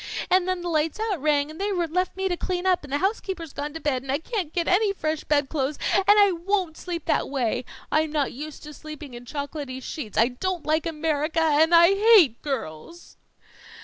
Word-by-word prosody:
And 370 Hz, 0 st, +4 dB
then 370 Hz, -1 st, -1 dB
the 350 Hz, -, -5 dB
"Lights 315 Hz, +2 st, 0 dB
out" 425 Hz, -8 st, -2 dB
rang, 295 Hz, 0 st, +1 dB
and 315 Hz, +5 st, -9 dB
they 410 Hz, +1 st, 0 dB
left 360 Hz, 0 st, -1 dB
me 385 Hz, 0 st, 0 dB
to 360 Hz, -, 0 dB
clean 360 Hz, +1 st, -3 dB
up, 365 Hz, -3 st, +2 dB
and 285 Hz, -, -11 dB
the 285 Hz, -, +1 dB
housekeeper's 375 Hz, -3 st, -3 dB
gone 290 Hz, +1 st, -4 dB
to -, -, -4 dB
bed, 280 Hz, -5 st, -1 dB
and 265 Hz, 0 st, -5 dB
I 275 Hz, -, +1 dB
can't 360 Hz, -1 st, -4 dB
get 340 Hz, -1 st, -1 dB
any 400 Hz, +3 st, +3 dB
fresh 310 Hz, -4 st, -2 dB
bed 290 Hz, -2 st, +1 dB
clothes, 280 Hz, 0 st, -2 dB, 0.2 s
and 390 Hz, -, +3 dB
I 410 Hz, -1 st, +6 dB
won't 360 Hz, -1 st, -1 dB
sleep 340 Hz, -2 st, -6 dB
that -, -, 0 dB
way! 255 Hz, -3 st, -1 dB, 0.3 s
I'm 310 Hz, 0 st, +1 dB
not 295 Hz, -3 st, -1 dB
used 300 Hz, +3 st, -8 dB
to 300 Hz, 0 st, -9 dB
sleeping 305 Hz, -2 st, -10 dB
in 240 Hz, 0 st, -10 dB
chocolaty 285 Hz, -1 st, -5 dB
sheets. 255 Hz, -5 st, -7 dB
I 230 Hz, +3 st, +4 dB
don't 355 Hz, +7 st, -3 dB
like 315 Hz, +2 st, +1 dB
America 315 Hz, 0 st, 0 dB
and 320 Hz, +2 st, +4 dB
I 340 Hz, +1 st, +8 dB
hate 395 Hz, -, +5 dB
girls." 270 Hz, -, -6 dB
315 Hz, 210 wpm, -25 LUFS, 290-365 Hz, 0.3 s, I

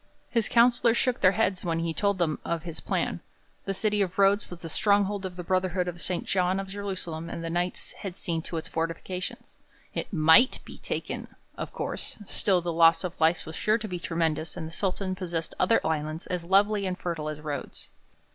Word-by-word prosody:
His 230 Hz, -3 st, +1 dB
councillors 235 Hz, 0 st, +5 dB
shook 255 Hz, -2 st, +1 dB
their 185 Hz, 0 st, +6 dB
heads 190 Hz, -4 st, +1 dB
when 165 Hz, -2 st, 0 dB
he 165 Hz, 0 st, -1 dB
told 200 Hz, +2 st, +1 dB
them 165 Hz, -4 st, 0 dB
of 165 Hz, -2 st, -2 dB
his 165 Hz, -2 st, -5 dB
plan. -, -, -1 dB, 0.5 s
The 195 Hz, -, -2 dB
city 210 Hz, +1 st, +1 dB
of 185 Hz, -3 st, -1 dB
Rhodes 200 Hz, +1 st, +4 dB
was 175 Hz, -1 st, -9 dB
the -, -, -4 dB
stronghold 200 Hz, +2 st, +2 dB
of 180 Hz, -, -10 dB
the 180 Hz, -, -5 dB
Brotherhood 185 Hz, 0 st, +1 dB
of 175 Hz, -1 st, -5 dB
St. 180 Hz, +3 st, -2 dB
John 185 Hz, 0 st, +1 dB
of 195 Hz, 0 st, -5 dB
Jerusalem 185 Hz, -5 st, -4 dB
and 165 Hz, -, -5 dB
the 165 Hz, -, -3 dB
Knights 175 Hz, +1 st, -1 dB
had 190 Hz, -2 st, -7 dB
seen 165 Hz, -2 st, -1 dB
to 165 Hz, -, -5 dB
its 160 Hz, -, -4 dB
fortifications. 165 Hz, +3 st, -4 dB, 0.3 s
It -, -, -3 dB
might 165 Hz, +8 st, +6 dB
be -, -, -10 dB
taken, -, -, -4 dB, 0.3 s
of -, -, -5 dB
course; -, -, -4 dB
still 190 Hz, -1 st, +2 dB
the 170 Hz, 0 st, -2 dB
loss 165 Hz, +1 st, +6 dB
of 180 Hz, -2 st, -3 dB
life 160 Hz, +1 st, +3 dB
was 160 Hz, -, -7 dB
sure 215 Hz, +1 st, +2 dB
to 220 Hz, -1 st, -5 dB
be 180 Hz, -3 st, -4 dB
tremendous 165 Hz, -2 st, -1 dB
and 160 Hz, -, -4 dB
the -, -, -9 dB
Sultan 190 Hz, +1 st, -1 dB
possessed 175 Hz, -3 st, -3 dB
other 205 Hz, +5 st, +4 dB
islands 155 Hz, 0 st, -2 dB
as 180 Hz, -2 st, -3 dB
lovely 200 Hz, +2 st, +3 dB
and 180 Hz, -1 st, -2 dB
fertile 165 Hz, -4 st, -3 dB
as 150 Hz, -1 st, -5 dB
Rhodes. 150 Hz, -2 st, -6 dB
180 Hz, 205 wpm, -28 LUFS, 165-195 Hz, 0.5 s, their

